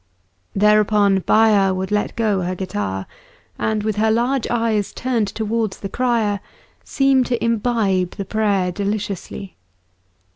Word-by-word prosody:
Thereupon 210 -1 +4
Baya 205 -1 +3
would 190 +1 -4
let 210 0 -1
go 210 -4 +1
her 180 +1 -2
guitar, 100 - -3 0.5
and 215 -1 -1
with 215 -1 -1
her 220 +1 +2
large 240 +3 +1
eyes 225 -4 0
turned 240 -4 -1
towards 220 0 -2
the 195 - -6
crier, 230 -4 0 0.4
seem 270 -2 +2
to 240 - 0
imbibe 220 -6 0
the 200 - -5
prayer 200 -3 0
deliciously. 200 - -4
210 Hz, 125 wpm, -20 LUFS, 195-230 Hz, 0.5 s, Thereupon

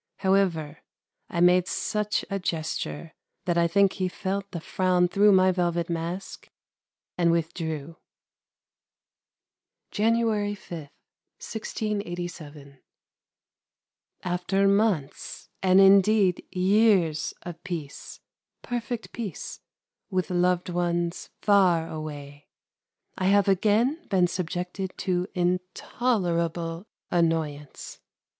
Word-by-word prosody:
However, 180 -6 +1 0.5
I 170 - -1
made 180 0 +5
such 210 +1 -1
a 195 - -2
gesture, 165 -1 -3 0.3
that 175 - +1
I 170 0 +3
think 195 +2 +3
he 185 -2 -1
felt 195 +1 -3
the 175 - -5
frown 180 +1 +1
through 205 +3 +4
my 185 -1 +5
velvet 175 -1 -1
mask 170 +3 -5 0.7
and 170 -1 +4
withdrew. 160 -1 -3 1.9
January 215 -2 +1
5, 165 -6 -9 0.5
1687. 175 - -5 1.4
After 185 +2 +1
months, 200 -8 0
and 185 0 +5
indeed 195 -1 +5
years 185 -4 +2
of 175 -2 -8
peace, 165 -7 -7 0.4
perfect 240 -1 -4
peace, 210 -9 -6 0.5
with 185 -2 -1
loved 180 0 +1
ones 175 -1 -1
far 185 -5 +4
away, 145 -2 -8 0.7
I 185 - 0
have 200 +1 +4
again 220 - +2
been 185 -3 +3
subjected 180 +2 -4
to 180 -1 -1
intolerable 180 -1 -1 0.2
annoyance. 160 -4 -1
180 Hz, 95 wpm, -26 LUFS, 170-200 Hz, 1.9 s, made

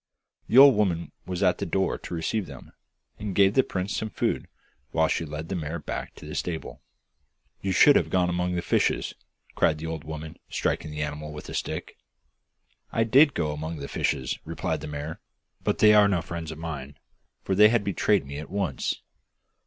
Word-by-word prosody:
The 120 - +2
old 140 0 +10
woman 90 -6 0 0.2
was 90 -1 -2
at - - +3
the - - -2
door - - +1
to - - -8
receive 90 +4 -1
them, 70 -3 -11 0.5
and 105 -3 -4
gave 100 0 +5
the 130 - +5
prince 95 -4 -3
some 110 - -2
food - - -1 0.4
while 80 -1 +2
she 80 - -1
led 75 +1 -6
the 95 - -3
mare 80 -1 -3
back 75 - -6
to - - -12
the - - -7
stable. 85 -3 -4 0.8
'You 95 - -1
should 140 +9 +7
have - - +2
gone 90 -1 +2
among 90 0 -1
the 85 - -2
fishes,' - - +1 0.4
cried 75 - +2
the 80 - -6
old 80 -2 -4
woman, 80 0 -7
striking 80 - -1
the 75 0 -3
animal 75 +1 -5
with 75 0 -9
a - - -7
stick. - - -4 0.9
'I 115 - +2
did 135 +6 +5
go 75 -3 0
among 80 +2 -4
the 70 -1 -6
fishes,' 65 -2 -1
replied - - -3
the - - -6
mare; 75 +2 -5 0.4
'but - - 0
they 105 0 +7
are 105 -1 +7
no 90 -5 0
friends 85 -1 -5
of 80 - -8
mine, 75 -4 -6 0.5
for - - -1
they 105 +4 +6
betrayed 100 -3 +1
me 70 +1 -6
at 80 - -8
once. 100 -2 -2
85 Hz, 195 wpm, -26 LUFS, 75-100 Hz, 0.9 s, old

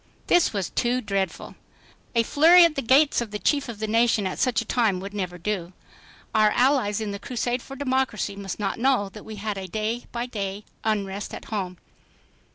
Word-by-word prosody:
This 350 -1 +4
was 195 -4 -3
too 245 +1 +1
dreadful. 195 -4 -3 0.6
A 230 - +4
flurry 335 +8 +7
at 335 - +2
the 275 - -2
gates 275 +3 +4
of 235 - -4
the 210 - -4
Chief 285 +4 0
of 230 - -6
the 220 - -3
nation 225 -1 +2
at 185 - -3
such 255 -3 +2
a - - -3
time 220 -7 +1
would 195 +2 -7
never 185 -3 -3
do. 185 -1 -3 0.6
Our 215 -1 +5
allies 245 -5 +2
in 215 -2 -3
the 200 - -5
crusade 245 +1 -2
for 270 - -10
democracy 260 -7 -1
must 195 -2 -6
not 200 0 -2
know 250 -5 +2
that - - -11
we 220 - -7
had 205 -1 -4
a 190 - -6
day 220 +5 -3
by 240 0 -3
day 205 -4 -5 0.2
unrest 205 -2 -2
at - - -10
home. 185 -4 -3
215 Hz, 200 wpm, -25 LUFS, 200-250 Hz, 0.6 s, flurry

